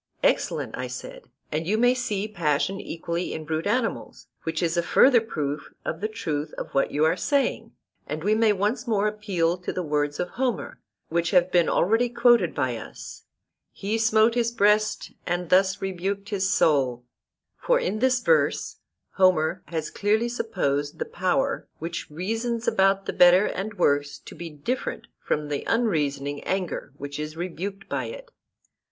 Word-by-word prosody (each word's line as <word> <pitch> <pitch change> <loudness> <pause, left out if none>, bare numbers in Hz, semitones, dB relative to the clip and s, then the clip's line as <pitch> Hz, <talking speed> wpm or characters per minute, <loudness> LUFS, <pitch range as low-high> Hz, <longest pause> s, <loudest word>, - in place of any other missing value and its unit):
Excellent, - - +1
I - - -4
said, - - -8 0.3
and 160 +2 -2
you 215 +3 +2
may 245 +2 +4
see 215 -5 -2
passion 175 -1 0
equally 170 +1 -4
in 155 - -6
brute 160 +3 -2
animals, 230 +2 -2 0.2
which 160 +1 -1
is 165 0 +1
a 170 - +3
further 240 +7 +5
proof 150 -9 -4 0.2
of 160 - -3
the 215 - 0
truth 155 -8 -4
of - - -6
what 135 - +2
you 150 +2 +2
are 160 +2 +3
saying. 280 +8 0 0.3
And 155 +1 -4
we 210 +3 +3
may 220 0 +4
once 210 +5 -1
more 210 -2 +2
appeal 190 -5 -1
to 180 - -4
the 185 - -3
words 145 -1 -1
of 180 - -1
Homer, 245 +1 -2 0.3
which 170 0 0
have 180 0 +3
been 175 -2 +4
already 225 +6 +2
quoted 235 -6 +4
by 130 -5 0
us, 110 - -10 0.5
'He 215 +3 -2
smote 225 0 +4
his 235 -1 +1
breast, 215 0 +2 0.2
and 175 0 -2
thus 190 +1 +3
rebuked 195 +2 -3
his 195 -2 0
soul,' 130 -9 +2 0.5
for - - +2
in 215 - -2
this 255 0 +2
verse 485 - +1 0.4
Homer 185 -2 +3
has 160 -2 -3
clearly 215 +3 +1
supposed 145 - -1
the - - -2
power 270 +10 -1
which 170 +2 -5
reasons 225 +8 -3
about 195 0 +3
the - - -3
better 180 +3 +6
and 205 +2 -4
worse 145 -5 +1
to - - -12
be 170 -1 -7
different 160 - -4 0.2
from 150 0 -1
the 145 -1 -2
unreasoning 145 - 0
anger 185 -6 -3
which 145 +1 -6
is 150 +1 -5
rebuked 190 +3 -5
by - - -2
it. - - -9
190 Hz, 170 wpm, -25 LUFS, 160-220 Hz, 0.5 s, better